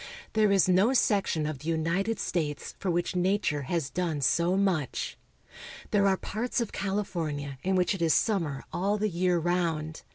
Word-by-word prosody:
There 215 -2 +3
is 195 -2 +4
no 190 +7 +4
section 200 -10 +2
of 150 -3 -4
the 150 - -9
United 170 +7 0
States 150 -7 -2
for 195 - -2
which 175 +1 0
nature 180 -4 +1
has 165 -6 -1
done 165 -5 -1
so 170 +6 +2
much. 185 -9 0 0.8
There 200 -1 +4
are 190 -1 +3
parts 235 +7 -2
of 235 -3 -2
California 165 -9 -3
in 190 +4 0
which 180 +2 +2
it 195 - -5
is 165 -2 +3
sum 210 -5 +2
mer 140 -4 -4
all 200 +4 0
the 215 +1 0
year 180 0 +1
round. 165 -2 -1
180 Hz, 175 wpm, -28 LUFS, 160-195 Hz, 0.8 s, is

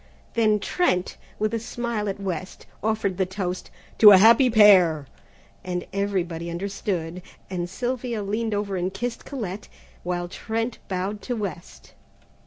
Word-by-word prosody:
Then 215 -2 +3
Trent, 195 - 0 0.2
with 215 +1 -1
a 230 - 0
smile 230 -2 -3
at 195 - -4
West, 190 -1 -5 0.2
offered 210 -3 -1
the 190 - +3
toast, 185 -1 -4 0.3
"To 215 - +11
a 200 - +10
Happy 230 +6 +6
Pair!" 185 -9 +6 0.6
and 180 -1 -3
everybody 180 -4 -2
understood, 180 -1 -3 0.3
and 175 -1 -3
Sylvia 240 +1 -3
leaned 215 +2 -1
over 205 -1 -2
and 180 +1 -1
kissed 230 +5 -4
Colette, 210 -7 -5 0.3
while 175 0 -3
Trent 225 +5 -3
bowed 195 +2 -3
to 245 - -3
West. 195 -5 -7
200 Hz, 140 wpm, -24 LUFS, 180-220 Hz, 0.6 s, To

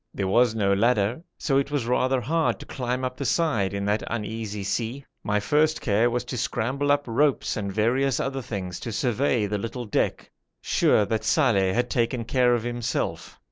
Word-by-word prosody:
There 100 - -1
was 115 +3 +3
no 100 -3 +2
ladder, 110 +4 +2 0.2
so 135 -3 +1
it 140 - -2
was 145 -5 -1
rather 130 +2 +1
hard 160 +6 0
to - - -9
climb 125 0 -3
up 125 - -3
the 140 - -3
side 135 - +1
in 100 0 -3
that 105 +1 +1
uneasy 110 -2 -4
sea. 115 +7 -3 0.2
My 105 0 +1
first 150 +8 +2
care 110 +2 +2
was 120 0 -2
to 125 - -5
scramble 130 +5 -1
up 145 0 +2
ropes 135 +4 +1
and 100 -2 -3
various 120 +6 +1
other 135 0 -2
things 95 -7 -5
to 115 - -5
survey 125 -1 +1
the 105 0 -2
little 120 +3 -5
deck, 105 - -1 0.3
sure 105 - +3
that 110 +2 -2
Saleh 105 -9 +2
had 125 +1 0
taken 120 -1 0
care 125 0 +3
of 115 - -2
himself. 120 0 -3
120 Hz, 190 wpm, -25 LUFS, 105-130 Hz, 0.3 s, was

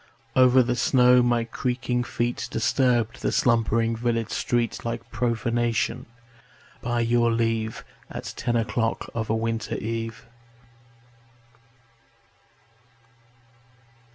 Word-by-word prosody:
Over 130 0 +6
the 120 0 -1
snow 125 0 +5
my 120 -1 +2
creaking 125 +1 -2
feet 120 0 -2
Disturbed 120 0 +1
the - - 0
slumbering 115 -1 +2
village 115 -1 -1
street 120 -1 -1
Like 115 - -5
profanation, 115 -1 -1 0.7
by 120 0 -1
your 120 0 +2
leave, 115 -1 -1 0.2
At - - -6
ten 120 -1 -1
o'clock 115 0 -1
of 110 -1 -3
a 110 - +2
winter 115 -1 -2
eve. 115 0 -4
115 Hz, 100 wpm, -25 LUFS, 115-120 Hz, 0.7 s, Over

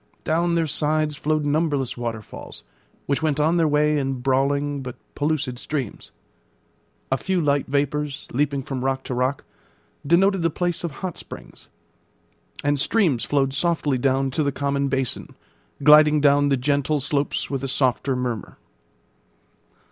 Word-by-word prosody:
Down 170 +2 +1
their 165 -1 +2
sides 155 0 0
flowed 155 +1 0
numberless 145 -3 0
waterfalls, 115 -3 -7 0.4
which 140 +2 0
went 150 -2 0
on 160 +3 +3
their 165 -2 +3
way 150 0 +2
in 135 -1 -1
brawling 140 +2 0
but 125 -2 -7 0.2
pellucid 145 -4 -1
streams. 135 -8 -5 1.0
A 135 - +3
few 190 +5 -1
light 145 -3 +1
vapours, 145 +1 -1
leaping 140 +1 0
from 130 -1 -4
rock 135 0 -1
to - - -4
rock, 130 +2 -1 0.6
denoted 185 +5 +3
the 165 - +2
place 175 +2 -2
of 170 - -1 0.2
hot 180 - -5
springs; - - -11 0.9
and 145 0 +1
streams 155 - +2
flowed 135 -2 +1
softly 150 -3 0
down 135 +1 +1
to 155 - -1
the 140 -1 +1
common 140 0 -1
basin, 135 -2 -2 0.5
gliding 150 +1 +7
down 145 0 +4
the 135 - +2
gentle 145 +3 +1
slopes 145 +1 -1
with 135 -1 -2
a - - -1
softer 130 0 +1
murmur. 125 -3 -4
145 Hz, 150 wpm, -23 LUFS, 135-155 Hz, 1.0 s, gliding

